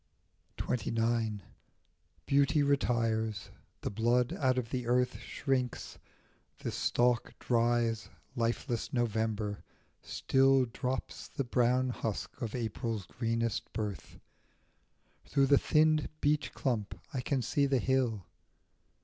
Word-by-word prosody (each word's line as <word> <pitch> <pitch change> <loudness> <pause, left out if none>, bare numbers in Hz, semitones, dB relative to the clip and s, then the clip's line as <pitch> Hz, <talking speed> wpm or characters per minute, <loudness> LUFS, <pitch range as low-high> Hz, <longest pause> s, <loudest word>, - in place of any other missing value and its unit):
XXIX. 115 -2 0 0.8
BEAUTY 140 +2 +3
retires; 110 -7 0 0.3
the - - -3
blood 120 +4 +2
out 130 -3 +1
of 120 -3 -2
the 125 -2 -2
earth 125 +1 +2
Shrinks, 130 -3 -2 0.6
the - - -4
stalk 120 -1 +1
dries, 115 -2 +1 0.3
lifeless 120 0 -1
November 110 -3 -1 0.4
still 135 0 +3
Drops 125 +2 -4
the 140 - -3
brown 125 +1 +2
husk 115 +2 -4
of 115 -1 -3
April's 115 -3 -3
greenest 115 +2 -2
birth. 105 -7 -4 1.1
Through 140 -1 +3
the 140 0 +5
thinned 155 -1 +3
beech 150 +1 +1
clump 115 -7 -2
I 130 - -1
can 130 0 0
see 140 +5 +2
the 135 -1 +2
hill. 125 -6 +1
120 Hz, 105 wpm, -32 LUFS, 115-130 Hz, 1.1 s, the